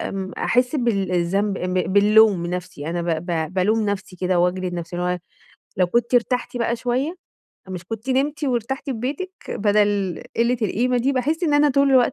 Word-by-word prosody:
امم، 190 Hz, -1 st, -4 dB
أحس 250 Hz, +4 st, +1 dB
بال 200 Hz, -7 st, 0 dB
الذنب 195 Hz, +3 st, 0 dB
آآ 180 Hz, -, -3 dB
ب 180 Hz, -, -2 dB, 0.2 s
باللوم 210 Hz, -1 st, +5 dB
من 170 Hz, -, -3 dB
نفسي، 180 Hz, -4 st, -5 dB
أنا 175 Hz, 0 st, -2 dB
ب 165 Hz, 0 st, -2 dB
ب 165 Hz, 0 st, -2 dB
بالوم 210 Hz, +4 st, +2 dB
نفسي 200 Hz, -2 st, -4 dB
كده 180 Hz, 0 st, 0 dB
وأجلد 180 Hz, 0 st, 0 dB
نفسي، 170 Hz, 0 st, -5 dB
اللي 180 Hz, 0 st, -1 dB
هو -, -, -5 dB, 0.6 s
لو 180 Hz, -, +4 dB
كنتِ 235 Hz, +6 st, 0 dB
ارتحتِ 245 Hz, +1 st, +1 dB
بقى 235 Hz, 0 st, 0 dB
شويّة، 255 Hz, +9 st, -1 dB, 0.5 s
مش 185 Hz, -1 st, -6 dB
كنتِ 225 Hz, +6 st, -5 dB
نمتِ 285 Hz, +3 st, 0 dB
وارتحتِ 260 Hz, +2 st, -2 dB
في 270 Hz, -, -1 dB
بيتك 280 Hz, +11 st, -4 dB, 0.2 s
بدل 205 Hz, -3 st, +1 dB
قلّة 235 Hz, +2 st, +2 dB
القيمة 245 Hz, +5 st, +1 dB
دي؟ 270 Hz, +4 st, +1 dB
باحس 295 Hz, +7 st, -1 dB
إن 295 Hz, -2 st, +2 dB
أنا 290 Hz, 0 st, +4 dB
طول 275 Hz, +1 st, +3 dB
الوقت 255 Hz, -1 st, +4 dB
215 Hz, 195 wpm, -22 LUFS, 185-250 Hz, 0.6 s, باللوم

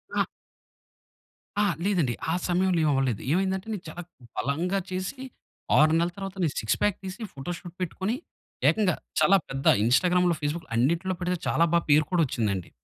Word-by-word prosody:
ఆ! -, -, +3 dB, 1.4 s
ఆ! -, -, +4 dB, 0.2 s
లేదండి. 170 Hz, -12 st, +1 dB, 0.2 s
ఆ -, -, +2 dB
సమయంలో 180 Hz, 0 st, +2 dB
ఏం 155 Hz, -, +3 dB
అవ్వలేదు. 130 Hz, -6 st, 0 dB
ఏమైందంటే 190 Hz, +3 st, 0 dB
నేను 195 Hz, -4 st, -5 dB
చాలా 175 Hz, -, -7 dB, 0.4 s
బలంగా 170 Hz, +8 st, 0 dB
చేసి, 185 Hz, +8 st, -4 dB, 0.6 s
6 155 Hz, +1 st, +6 dB
నెలల 170 Hz, +1 st, +1 dB
తర్వాత 195 Hz, 0 st, -6 dB
నేను 155 Hz, -, +1 dB
6 110 Hz, -, 0 dB
ప్యాక్ 205 Hz, -3 st, +2 dB
తీసి, 190 Hz, +4 st, -7 dB
ఫోటో 135 Hz, +5 st, -5 dB
షూట్ 175 Hz, -3 st, -11 dB
పెట్టుకొని, 190 Hz, +5 st, -2 dB, 0.5 s
ఏకంగా 205 Hz, -4 st, +2 dB, 0.2 s
చాలా 195 Hz, -, +6 dB
పెద్ద 135 Hz, 0 st, -5 dB, 0.2 s
ఇన్‌స్టా‌గ్రామ్‌లో, 175 Hz, +8 st, +3 dB
ఫేస్‌బుక్‌లో 155 Hz, +3 st, -3 dB
అన్నిట్లో 170 Hz, +9 st, +1 dB
పెడితే 180 Hz, 0 st, 0 dB
చాలా 170 Hz, -, +3 dB
బా 170 Hz, -, +5 dB
పేరు 150 Hz, +1 st, +5 dB
కూడా 180 Hz, -2 st, +3 dB
వచ్చిందండి. 105 Hz, -8 st, -2 dB
175 Hz, 160 wpm, -27 LUFS, 145-190 Hz, 1.4 s, 6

